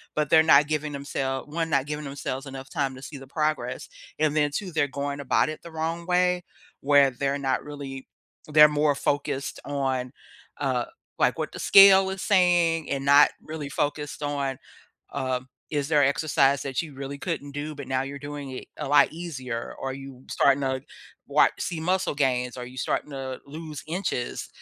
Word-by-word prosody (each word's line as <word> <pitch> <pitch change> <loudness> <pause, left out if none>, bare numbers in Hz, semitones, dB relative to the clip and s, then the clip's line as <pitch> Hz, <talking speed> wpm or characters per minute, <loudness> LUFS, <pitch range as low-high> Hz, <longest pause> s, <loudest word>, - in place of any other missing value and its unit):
but 150 -2 0
they're 160 - +7
not 150 -2 +6
giving 150 -1 -2
themsel 135 -1 -3
1, 165 +2 -2
not 140 -3 +2
giving 150 0 -4
themselves 135 0 -5
enough 135 0 -8
time 140 -5 -2
to 130 - -11
see 140 +1 -8
the 135 - -11
progress, 155 - -2 0.3
and 155 -1 +2
then 145 -1 +2
2, 190 0 -3
they're 145 -3 +1
going 140 +1 -4
about 140 - +2
it 155 - -6
the 170 - -10
wrong 165 +2 -3
way 180 0 +2 0.4
where 140 -1 +5
they're 140 +3 -1
not 135 -1 0
really 140 -2 -8 0.5
they're 150 0 +9
more 150 -1 +2
focused 140 -1 -2
on, 130 -3 -2 0.5
uh, 130 -3 0 0.3
like, - - +3
"What - - -3
the - - -8
scale 195 -1 +8
is 190 0 -5
saying," 175 -5 +3
and 135 -1 -2
not 140 +1 +7
really 155 -2 -6
focused 150 +1 -2
on, 140 -2 -2 0.5
um, 130 -2 -3 0.2
"Is 145 -1 -2
there 150 -3 +4
exercise 140 -1 +2
that 135 +1 -1
you 155 -3 -9
really 135 +1 -6
couldn't 145 0 -4
do, 150 +1 -5
but 140 -3 -8
now 130 0 +1
you're 140 +1 -7
doing 145 -1 -7
it 130 - -7
a - - -4
lot 145 - +5
easier? 135 -8 -5
Are 135 - -2
you 135 -1 -10
starting 140 0 +3
to 130 -1 -1 0.5
wat - - +4
see 170 -3 -3
muscle 180 -3 0
gains? 125 -3 0
Are 125 - -5
you 125 +1 -12
starting 140 - -1
to 135 -2 -5
lose 155 0 -8
inches?" 165 -8 -3
145 Hz, 185 wpm, -26 LUFS, 135-155 Hz, 0.5 s, they're